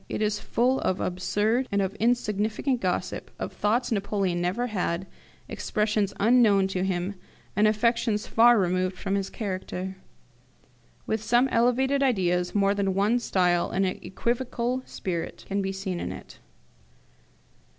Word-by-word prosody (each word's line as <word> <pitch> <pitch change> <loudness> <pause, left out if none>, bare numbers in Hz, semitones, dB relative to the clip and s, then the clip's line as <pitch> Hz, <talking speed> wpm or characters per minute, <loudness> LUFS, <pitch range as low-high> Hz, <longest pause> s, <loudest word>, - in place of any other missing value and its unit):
It - - -3
is 210 0 0
full 255 +3 +1
of 185 - -1
absurd 210 +7 0
and 200 - +1
of 195 0 0
insignificant 225 +2 0
gossip, 180 -1 -2
of - - -5
thoughts 230 +5 0
Napoleon 195 -4 0
never 185 +8 0
had, 190 -5 -2 0.4
expressions 210 -2 -1
unknown 210 -4 +4
to 185 -1 -1
him, 185 0 -1 0.4
and 210 +2 +4
affectations 220 0 +1
far 235 +1 +5
removed 185 -1 0
from 195 +1 -3
his 195 -1 -1
character. 190 -2 -5 1.1
With 220 -1 -1
some 240 +4 +3
elevated 260 +4 +2
ideas, 180 -9 +1
more 200 -1 +3
than 195 -2 0
one 210 +5 +2
style 180 -6 +1
and 195 +1 +1
an 185 - -2
equivocal 245 +3 -2
spirit 170 -3 -5
can 200 0 -1
be 195 0 -2
seen 190 -2 -4
in - - -4
it. - - -11
205 Hz, 140 wpm, -26 LUFS, 190-235 Hz, 1.1 s, far